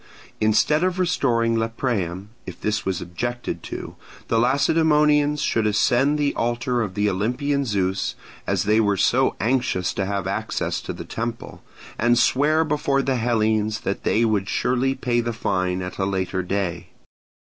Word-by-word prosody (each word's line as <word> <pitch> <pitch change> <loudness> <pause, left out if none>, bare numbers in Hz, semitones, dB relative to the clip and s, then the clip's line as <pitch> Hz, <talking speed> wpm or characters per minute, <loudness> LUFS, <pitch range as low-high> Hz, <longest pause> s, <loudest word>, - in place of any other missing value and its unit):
Instead 110 +9 +3
of 185 0 0
restoring 120 -10 +1
Lepreum, 110 -5 -2 0.2
if - - -8
this 105 +1 -1
was 95 -2 -1
objected 120 +8 -4
to, - - -7 0.3
the 115 - +2
Lacedaemonians 150 +2 +3
should 110 -1 +1
ascend 125 +7 +2
the 145 -1 +1
altar 120 +1 -1
of 100 -4 -3
the 105 0 +1
Olympian 125 +9 0
Zeus, 95 -4 -1 0.3
as - - +1
they 105 +2 +3
were 100 -2 +1
so 130 +7 +2
anxious 115 -6 0
to 95 -1 -2
have 100 -2 -2
access 95 +1 -2
to - - -5
the - - -7
temple, 115 0 -5 0.4
and 120 +1 +3
swear 150 +6 +3
before 145 -3 0
the 135 -2 0
Hellenes 110 -2 +1
that 100 - -3
they 115 +2 +2
would 100 -4 0
surely 130 +2 +1
pay 120 -2 0
the 120 0 -3
fine 95 -4 -1
at 90 +2 -7
a 95 - +1
later 95 -1 -1
day. 90 -2 -3
115 Hz, 160 wpm, -23 LUFS, 100-135 Hz, 0.4 s, Instead